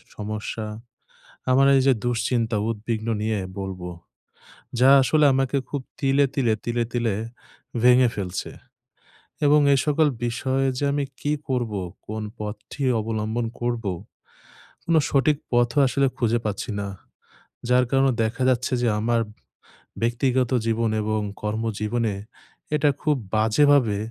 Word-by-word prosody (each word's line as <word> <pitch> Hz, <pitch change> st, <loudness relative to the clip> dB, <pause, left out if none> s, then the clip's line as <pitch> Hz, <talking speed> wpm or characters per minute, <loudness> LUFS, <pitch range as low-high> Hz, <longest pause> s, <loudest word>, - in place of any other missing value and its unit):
সমস্যা, 110 Hz, +1 st, -4 dB, 0.9 s
আমার 135 Hz, +2 st, +5 dB
এইযে 135 Hz, 0 st, +4 dB
দুশ্চিন্তা, 120 Hz, -1 st, 0 dB
উদ্বিগ্ন 110 Hz, 0 st, -3 dB
নিয়ে 110 Hz, -1 st, 0 dB, 0.2 s
বলবো। 95 Hz, -2 st, -5 dB, 0.9 s
যা 130 Hz, -, +5 dB
আসলে 150 Hz, +3 st, +3 dB
আমাকে 135 Hz, +1 st, +1 dB
খুব 145 Hz, -, -3 dB, 0.2 s
তিলে, 140 Hz, 0 st, +3 dB
তিলে, 120 Hz, -6 st, +2 dB
তিলে, 120 Hz, 0 st, 0 dB
তিলে 120 Hz, -4 st, 0 dB, 0.7 s
ভেঙে 125 Hz, 0 st, +6 dB
ফেলছে 95 Hz, -2 st, -4 dB, 0.9 s
এবং 150 Hz, +1 st, +6 dB
এই 135 Hz, -, +3 dB
সকল 150 Hz, +1 st, +3 dB, 0.2 s
বিষয়ে 130 Hz, +3 st, 0 dB
যে 145 Hz, -, -2 dB
আমি 145 Hz, 0 st, 0 dB, 0.2 s
কী 145 Hz, -, -1 dB, 0.2 s
করবো? 120 Hz, -6 st, -1 dB, 0.3 s
কোন 110 Hz, +1 st, -4 dB, 0.2 s
পথটি 105 Hz, +6 st, -6 dB, 0.2 s
অবলম্বন 110 Hz, +1 st, -2 dB
করবো? 120 Hz, -4 st, -1 dB, 0.9 s
কোনো 165 Hz, -1 st, +4 dB
সঠিক 145 Hz, +1 st, +3 dB
পথও 120 Hz, +3 st, +2 dB
আসলে 135 Hz, +2 st, +2 dB
খুঁজে 120 Hz, -1 st, +1 dB
পাচ্ছি 105 Hz, +3 st, -3 dB
না। 100 Hz, -, -3 dB, 0.8 s
যার 125 Hz, 0 st, +4 dB
কারণে 135 Hz, -1 st, +3 dB
দেখা 110 Hz, +4 st, -1 dB
যাচ্ছে 125 Hz, 0 st, +1 dB
যে 120 Hz, -, +2 dB
আমার 115 Hz, +1 st, +1 dB, 0.8 s
ব্যক্তিগত 125 Hz, +2 st, +1 dB
জীবন 115 Hz, 0 st, +1 dB
এবং 110 Hz, 0 st, 0 dB, 0.2 s
কর্মজীবনে 110 Hz, 0 st, -1 dB, 0.6 s
এটা 150 Hz, 0 st, +3 dB
খুব 150 Hz, -1 st, +2 dB, 0.2 s
বাজেভাবে 110 Hz, 0 st, +4 dB
120 Hz, 120 wpm, -24 LUFS, 110-135 Hz, 0.9 s, ভেঙে